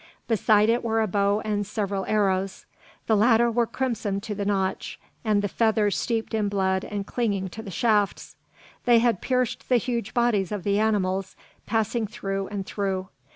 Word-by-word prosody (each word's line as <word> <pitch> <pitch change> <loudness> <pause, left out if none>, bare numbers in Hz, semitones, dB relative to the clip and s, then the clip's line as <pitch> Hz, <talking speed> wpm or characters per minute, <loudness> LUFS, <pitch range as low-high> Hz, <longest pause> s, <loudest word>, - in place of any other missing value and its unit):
Beside 215 -2 +3
it 235 +2 +2
were 225 -1 +1
a 220 - +3
bow 200 +1 +1
and 205 -1 0
several 200 -1 -3
arrows. 195 -2 0 0.4
The 220 - +3
latter 230 +2 +4
were 235 0 +1
crimsoned 220 -7 -2
to 220 - -4
the 200 0 -3
notch, 195 -2 -1 0.2
the 205 -2 +2
feathers 215 0 +1
steeped 230 -1 -2
in 215 -2 +1
blood 190 -1 0
and 205 -1 -4
clinging 200 -5 -1
to 220 - -8
the 205 - -8
shafts. 210 +1 0 0.5
They 240 -2 +6
had 230 -4 +2
pierced 255 -2 -1
the 250 - +5
huge 235 -2 -3
bodies 230 -6 +2
of 205 -4 -3
the 200 +1 +1
animals, 195 -3 0 0.3
passing 225 +1 0
through 195 -2 -4
and 200 -2 -4
through. 190 -2 -3
210 Hz, 170 wpm, -25 LUFS, 195-225 Hz, 0.5 s, They